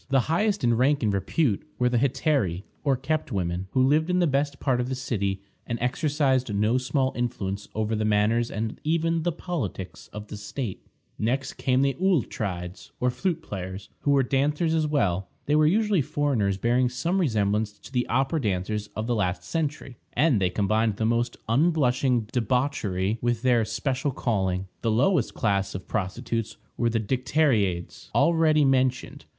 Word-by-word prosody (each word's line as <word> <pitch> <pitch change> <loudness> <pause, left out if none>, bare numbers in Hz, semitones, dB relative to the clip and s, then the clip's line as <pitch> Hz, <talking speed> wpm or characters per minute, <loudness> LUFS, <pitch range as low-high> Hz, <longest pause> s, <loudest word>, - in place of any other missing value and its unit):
The 135 -1 +4
highest 200 - 0
in 120 -1 +3
rank 135 +2 +2
and 105 -2 +2
repute 100 - +1 0.2
were 125 - +2
the 125 -1 +2
Hetairæ, 130 - +1 0.2
or 140 -3 +2
kept 140 +2 -2
women, 90 -2 -2
who 130 - +4
lived 155 +5 +2
in 180 - +2
the 180 - +3
best 140 -1 0
part 125 -3 +1
of 125 - -3
the 130 - -1
city, 100 -7 -2 0.2
and 120 - -2
exercised 135 -1 +1
no 105 +5 +2
small 130 +1 0
influence 105 -5 -3
over 110 +1 0
the 110 - -1
manners 110 +3 +2
and 110 +1 -4
even 165 +1 +1
the 175 +2 0
politics 140 - -5
of 105 0 -9
the 105 - -6
state. 105 +1 -6 0.3
Next 130 +4 -1
came 130 0 +1
the 140 0 +2
Auletrides, 95 - -1
or 125 0 +2
flute 170 +3 -2
players, 95 0 -6
who - - -2
were 140 -1 +4
dancers 145 +5 +1
as 160 -1 +2
well. 100 - 0 0.2
They 150 - +2
were 155 0 +5
usually 205 0 +3
foreigners, 125 -9 0
bearing 120 +4 +2
some 165 +10 0
resemblance 105 - +1
to 115 +4 -15
the 125 -2 0
opera 135 +5 +1
dancers 105 0 -1
of 110 - -2
the 120 - 0
last 90 -4 -1
century, 145 - -3 0.2
and 140 -9 +3
they 90 - +3
combined 110 +3 +1
the 110 - 0
most 120 +1 0
unblushing 130 -2 +2
debauchery 115 -5 0
with 120 -1 0
their 120 -3 +4
special 135 +4 -1
calling. 95 -8 -1 0.2
The 115 - 0
lowest 130 - +2
class 100 -3 0
of 95 - -7
prostitutes 115 +3 -3 0.2
were 120 - +1
the 115 0 0
Dicteriades, 110 - 0
already 155 0 +4
mentioned. 130 -1 0
125 Hz, 170 wpm, -26 LUFS, 105-145 Hz, 0.3 s, were